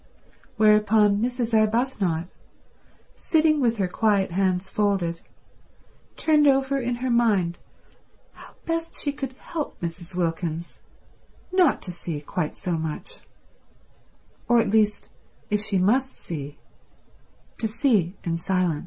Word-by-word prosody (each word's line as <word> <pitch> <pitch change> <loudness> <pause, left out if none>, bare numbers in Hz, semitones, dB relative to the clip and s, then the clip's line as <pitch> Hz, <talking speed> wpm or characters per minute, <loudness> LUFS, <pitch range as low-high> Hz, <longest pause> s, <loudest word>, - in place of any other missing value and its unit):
Whereupon 210 -1 +4
Mrs. 245 -1 -1
Arbuthnot, 215 -6 +1 0.9
sitting 310 - +2
with 235 -2 +2
her 195 -3 +1
quiet 200 0 +1
hands 185 0 0
folded, 190 -5 0 1.0
turned 300 -2 +4
over 270 0 +3
in 245 -1 -1
her 255 - 0
mind 205 -8 +2 0.7
how - - -15
best 330 0 -2
she 285 - -1
could 270 -2 -6
help 305 +3 -6
Mrs. 170 +1 -6
Wilkins 170 -1 -3 0.7
not 365 -6 +3
to 180 - -5
see 170 -3 -5
quite 150 +2 -4
so 180 - -4
much; 160 - -5 1.3
or 240 -1 +5
at 225 - +1
least, 210 0 +1 0.4
if 210 0 +2
she 210 -2 0
must 250 +9 +1
see, 145 -3 -7 1.0
to 225 - 0
see 210 - +1
in 165 -1 -1
silence. 180 -4 0
210 Hz, 120 wpm, -24 LUFS, 175-250 Hz, 1.3 s, or